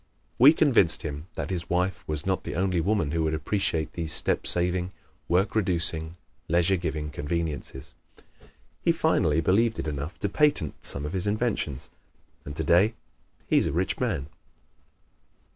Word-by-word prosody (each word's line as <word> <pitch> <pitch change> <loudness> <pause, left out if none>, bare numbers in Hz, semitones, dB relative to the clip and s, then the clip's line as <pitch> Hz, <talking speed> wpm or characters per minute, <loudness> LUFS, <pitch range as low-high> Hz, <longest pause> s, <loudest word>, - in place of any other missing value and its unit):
We 135 +5 +9
convinced 135 - +3
him 75 +1 -6
that - - -4
his 85 -3 -3
wife 90 +1 0
was 75 -1 -2
not 95 -1 -1
the - - -5
only 90 -1 +1
woman 95 -4 0
who 80 0 0
would 80 0 0
appreciate 80 0 -2
these 80 -2 -4
step - - 0
saving, 90 +1 0 0.3
work 90 +4 +1
reducing, 85 -5 +2 0.3
leisure 85 +3 +2
giving 80 -4 -3
conveniences. 75 -2 -4 0.9
He - - +3
finally 75 +1 +2
believed 110 +7 +2
it - - -3
enough 75 +3 -5
to - - +1
patent 145 - +1
some 70 +1 +2
of 75 - -5
his 95 +1 -1
inventions, 105 - -2 0.5
and 70 - -7
today 90 +8 +3 0.5
he - - +3
is - - 0
a - - -1
rich 90 +3 -1
man. 95 - -1
85 Hz, 155 wpm, -26 LUFS, 80-95 Hz, 0.9 s, We